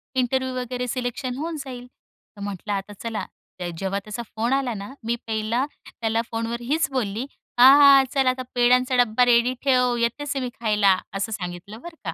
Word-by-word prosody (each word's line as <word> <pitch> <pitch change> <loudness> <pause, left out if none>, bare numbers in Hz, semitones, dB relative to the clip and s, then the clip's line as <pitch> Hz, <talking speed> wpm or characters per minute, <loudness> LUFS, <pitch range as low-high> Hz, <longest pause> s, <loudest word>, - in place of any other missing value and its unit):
Interview 260 0 0
वगैरे 250 0 -3
selection 250 0 -3
होऊन 320 +1 -4
जाईल. 250 -2 -8 0.5
तर - - -10
म्हटलं 205 +1 -4
आता 200 +1 -4
चला, 225 -2 -3 0.3
ते 175 -1 -3
जेव्हा 195 +1 -1
त्याचा 215 +3 -6
फोन 235 +4 0
आला 270 -3 0
ना, 205 +5 -7
मी 235 +1 0
पहिला 220 +4 0 0.4
त्याला 225 0 +1
फोनवर 230 +1 -3
हीच 300 +7 0
बोलली, 230 -2 -2 0.3
"हा, 255 - +10 0.2
हा. 275 -1 +8
चल 270 -2 +2
आता 255 0 +1
पेड्यांचा 250 +1 +3
डब्बा 240 +2 +2
रेडी 245 +1 +4
ठेव, 250 -2 +3
येतेच 270 +5 -1
मी 255 -2 -2
खायला" 210 -4 +3 0.2
असं 200 +3 -2
सांगितलं 185 +2 -6
बरं 345 -1 -10
का. 165 - -2
240 Hz, 180 wpm, -24 LUFS, 215-255 Hz, 0.5 s, हा